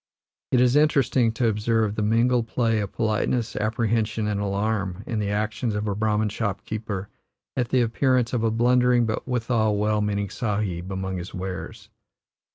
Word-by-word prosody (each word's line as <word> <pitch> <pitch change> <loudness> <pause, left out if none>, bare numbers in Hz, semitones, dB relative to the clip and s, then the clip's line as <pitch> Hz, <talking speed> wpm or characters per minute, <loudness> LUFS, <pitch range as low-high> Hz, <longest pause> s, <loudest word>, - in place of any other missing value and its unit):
It 125 - +4
is 125 +1 +4
interesting 140 -5 +3
to 115 0 +1
observe 110 0 +1
the 105 - -3
mingled 115 +2 +2
play 115 -2 +1
of 100 -2 -3
politeness, 110 +1 -1
apprehension, 110 0 0
and 105 -1 -1
alarm 100 -1 -1
in 115 -3 -2
the 105 -1 -1
actions 110 +2 -1
of 105 +1 -2
a 100 - 0
Brahman 105 +1 +1
shopkeeper 105 -1 -4 0.5
at 120 -2 -1
the 130 - +3
appearance 125 +1 +1
of 120 -3 0
a 115 - +3
blundering, 125 +1 +3
but 110 +2 -3
withal 115 -4 +1
well 105 +1 +1
meaning 100 -1 -1
Sahib, 100 -5 -2
among 95 0 -3
his 90 +1 -7
wares. 95 0 -6
110 Hz, 165 wpm, -24 LUFS, 105-120 Hz, 0.5 s, It